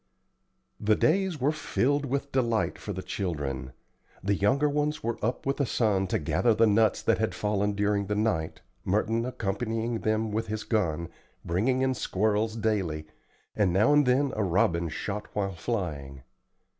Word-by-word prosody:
The 105 0 +3
days 185 - +1
were 135 +4 +2
filled 145 -2 0
with 140 +2 -2
delight 120 -4 0
for 105 - -5
the 95 -1 -5
children. 70 - -3 0.5
The 100 +1 +2
younger 130 +10 +2
ones 150 +1 -1
were 115 -1 -3
up 120 +3 -1
with 135 0 0
the 140 - +1
sun 100 -6 +1
to - - 0
gather 80 +10 +2
the 115 +1 +5
nuts 110 0 +3
that - - +2
had - - -1
fallen 105 0 0
during 100 0 0
the 105 - -1
night, 105 -7 -1 0.2
Merton 115 +4 0
accompanying 115 0 -2
them 110 0 0
with 110 +2 -2
his 110 0 -3
gun, 85 -7 -1 0.4
bringing 120 +10 +1
in 130 0 +2
squirrels 110 0 0
daily, 100 -9 -1 0.5
and 100 -4 +2
now 105 +10 +4
and 145 -2 +4
then 135 +2 +2
a 110 - 0
robin 85 -2 +1
shot 105 +6 -4
while 100 -2 -1
flying. 80 - -4
110 Hz, 165 wpm, -28 LUFS, 95-125 Hz, 0.5 s, the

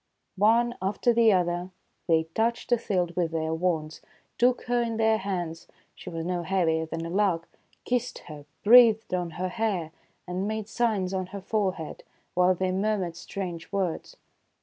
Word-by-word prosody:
One 230 +3 +4
after 205 +5 +1
the 230 -1 +5
other 175 -1 0 0.4
they 160 -2 +4
touched 235 +2 -1
Othilde 185 -7 0
with 175 -2 +1
their 160 0 -2
wands, 160 -2 -1 0.4
took 245 +1 +3
her 245 0 +1
in 230 -1 -2
their 220 -1 +3
hands, 175 -4 -4
— - - -39
she - - -10
was 165 -1 -5
no 180 0 -1
heavier 165 -3 +1
than 165 +1 -4
a - - -4
lark, 185 -4 +1 0.2
— - - -37
kissed 250 0 -2
her, 150 -3 -10 0.2
breathed 225 -2 +6
on 180 -2 -1
her 185 +1 -1
hair, 190 -6 -2 0.4
and 185 +3 -2
made 215 -1 -3
signs 215 -6 0
on 185 -1 -2
her 200 +1 -7
forehead, 190 -5 -2 0.3
while 180 +1 +4
they 185 +1 -1
murmured 190 -3 -1
strange 175 -2 -6
words. 190 -5 -2
185 Hz, 170 wpm, -27 LUFS, 170-220 Hz, 0.4 s, breathed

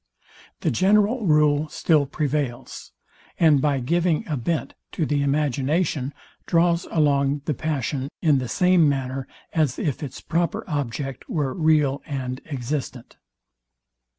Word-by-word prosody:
The - - +1
general 210 +3 +2
rule 150 -1 +3
still 150 -4 +2
prevails, 140 -4 -3 0.5
and 155 -5 +5
by 145 -2 +1
giving 170 +4 +1
a 155 - -1
bent 155 +6 -2 0.2
to 160 - 0
the 145 -1 0
imagination 140 +1 0 0.4
draws 170 0 +2
along 140 -2 +1
the 150 - 0
passion, 140 -2 -2
in 150 -5 +3
the 130 - -4
same 180 +3 +4
manner 135 -1 -3 0.3
as 150 -6 +1
if 145 -5 -2
its 140 -4 -6
proper 175 +6 -1
object 135 -3 -4
were 145 -5 -1
real 150 -4 +2
and 130 -3 -4
existent. 130 -2 -4
145 Hz, 125 wpm, -23 LUFS, 135-160 Hz, 0.5 s, and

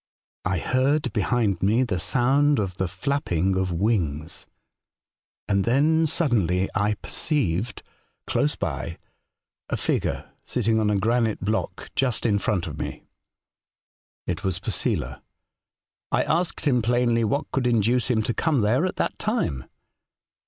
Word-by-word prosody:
" - - -86
I 95 0 +1
heard 130 - +1
behind 105 -3 +1
me 110 +6 +3
the 100 -8 -1
sound 140 - +3
of 95 -4 -2
the 95 - 0
flapping 95 - -1
of 95 -1 0
wings, 85 -5 -1 1.0
and 100 -1 +2
then 155 +7 +3
suddenly 105 - +1
I 105 0 +1
perceived, 115 - -1 0.4
close - - +1
by, 85 - -4 0.7
a - - -1
figure - - -1
sitting 115 -2 +1
on 105 -1 +2
a 105 - +2
granite 115 +2 +1
block 110 +3 -2
just 125 -4 0
in 105 -3 +3
front 95 -4 0
of - - -7
me. - - -5 1.2
It - - -3
was 95 -2 0
Posela. 90 - -2 0.9
I - - +3
asked 170 0 -1
him 125 -5 +3
plainly 120 0 +2
what 115 +7 -1
could 130 -2 0
induce 120 +1 +2
him 110 -3 +2
to 120 - -1
come 150 -3 +1
there 125 - +2
at 185 - -4
that - - -2
time. 205 - -1
110 Hz, 140 wpm, -25 LUFS, 95-130 Hz, 1.2 s, me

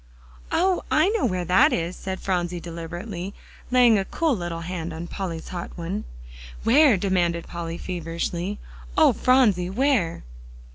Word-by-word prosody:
"Oh! 370 +1 +2
I 380 - +4
know 425 - +1
where 185 -3 -2
that 180 +2 +5
is," 170 +1 -1
said 190 0 -5
Phronsie 180 -2 -1
deliberately, 175 +3 -6 0.3
laying 245 -4 +5
a 195 - -2
cool 320 +2 0
little 175 -3 -4
hand 170 0 -4
on 165 +2 -5
Polly's 170 -3 -5
hot 175 -2 -5
one. 180 +5 -4 0.6
"Where?" 270 -1 +6
demanded 175 -3 0
Polly 170 -1 -5
feverishly. 175 +2 -3 0.4
"Oh, - - +6
Phronsie! 215 -9 +3
where?" 225 -6 +1
180 Hz, 140 wpm, -24 LUFS, 170-215 Hz, 0.6 s, Where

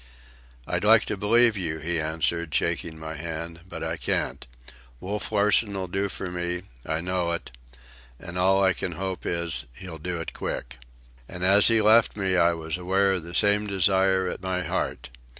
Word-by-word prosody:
"I'd - - -2
like 110 +1 +6
to 105 - -2
believe 115 +3 +3
you," 85 -5 -2
he 80 +1 -1
answered, 80 +1 -1
shaking 80 -1 -1
my 80 0 -6
hand, 85 +1 -5
"but - - -6
I - - -3
can't. - - -2 0.5
Wolf 100 - -3
Larsen 105 0 +2
'll 95 - -2
do 95 +2 -2
for 95 -1 -5
me, 90 0 -3 0.2
I 80 +1 -2
know 90 -1 -1
it; 85 - -5 0.7
and 85 - -8
all 95 +2 +3
I 95 0 +4
can 90 - -4
hope 95 +2 -4
is, 85 -1 -1
he'll 90 -4 -9
do 90 +2 -3
it 80 - -6
quick." 60 +2 -5 0.5
And 90 - -6
as 100 +2 +6
he 115 -2 +3
left 110 +1 +5
me 95 -2 0
I 85 -1 +4
was 80 0 -3
aware 95 +2 +2
of 95 -2 -1
the 85 +1 -4
same 105 +1 +3
desire 95 -1 +2
at 90 - -5
my 90 -1 -2
heart. 80 - -3
90 Hz, 185 wpm, -26 LUFS, 85-100 Hz, 0.7 s, like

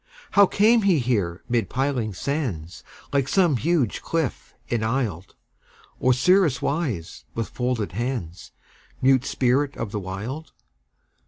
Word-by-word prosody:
How 200 -1 +6
came 220 +5 +4
he 195 -5 +4
here 105 -10 -1
mid 115 -5 0
piling 125 -6 -1
sands, 115 - -3 0.3
Like 140 -2 +2
some 175 -7 +3
huge 150 -4 0
cliff 165 -5 -3
enisled, 110 -6 -2 0.7
Osiris 140 +4 +4
wise, 140 - -3
with 115 -1 -2
folded 125 -4 -2
hands, 110 -5 -4 0.5
Mute 130 -1 +4
spirit 135 +3 +1
of 115 -3 -4
the 105 - -2
Wild? 105 +12 -6
125 Hz, 115 wpm, -24 LUFS, 110-145 Hz, 0.7 s, How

